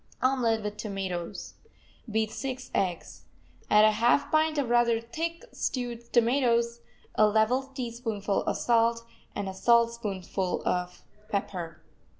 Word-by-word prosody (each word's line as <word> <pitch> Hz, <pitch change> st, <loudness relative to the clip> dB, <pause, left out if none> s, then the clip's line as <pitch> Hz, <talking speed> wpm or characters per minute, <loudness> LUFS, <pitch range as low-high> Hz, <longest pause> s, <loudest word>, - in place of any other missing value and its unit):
OMELET 240 Hz, -4 st, +2 dB
WITH 210 Hz, 0 st, -4 dB
TOMATOES 190 Hz, -5 st, -4 dB, 0.6 s
Beat 220 Hz, 0 st, 0 dB
six 260 Hz, 0 st, -5 dB
eggs. 165 Hz, -, -2 dB, 0.4 s
Add 210 Hz, 0 st, +7 dB
a 215 Hz, -, +6 dB
half 235 Hz, +6 st, +2 dB
pint 310 Hz, 0 st, +2 dB
of 280 Hz, -3 st, +1 dB
rather 235 Hz, -1 st, +4 dB
thick 330 Hz, +9 st, -4 dB
stewed 240 Hz, -2 st, -4 dB
tomatoes, 235 Hz, -1 st, +2 dB, 0.3 s
a 215 Hz, -, +5 dB
level 220 Hz, +5 st, +3 dB
teaspoonful 230 Hz, -5 st, -2 dB
of -, -, 0 dB
salt 230 Hz, 0 st, +2 dB, 0.3 s
and 205 Hz, -1 st, -3 dB
a 190 Hz, -, -4 dB
saltspoonful 210 Hz, -4 st, +1 dB
of 180 Hz, 0 st, -2 dB, 0.3 s
pepper. 175 Hz, -6 st, -4 dB
230 Hz, 125 wpm, -28 LUFS, 200-240 Hz, 0.6 s, Add